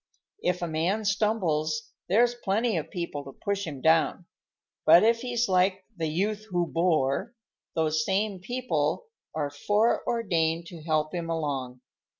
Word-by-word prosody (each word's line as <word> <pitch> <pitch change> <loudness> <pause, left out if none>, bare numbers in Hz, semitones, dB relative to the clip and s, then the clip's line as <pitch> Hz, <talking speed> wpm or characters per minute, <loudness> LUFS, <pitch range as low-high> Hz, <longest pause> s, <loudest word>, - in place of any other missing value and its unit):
If 180 0 0
a - - -1
man 175 +7 0
stumbles, 165 -8 0 0.2
there's 235 +5 +4
plenty 225 0 0
of - - -3
people 170 -6 -4
to 135 -1 -10
push 200 -2 -1
him 140 -4 -6
down. 160 +3 +3 0.6
But 175 - +7
if 230 +1 +3
he's 240 -1 0
like 185 0 +2
'the 165 -3 -2
youth 205 +7 -1
who 175 -2 +1
bore,' 165 - 0 0.4
those 155 -1 +1
same 195 +2 0
people 250 - -1 0.3
are 145 -2 -1
foreordained 175 -2 +1
to 170 -3 -10
help 155 -1 0
him 170 -2 -3
along. 135 -6 -3
175 Hz, 145 wpm, -27 LUFS, 155-210 Hz, 0.6 s, But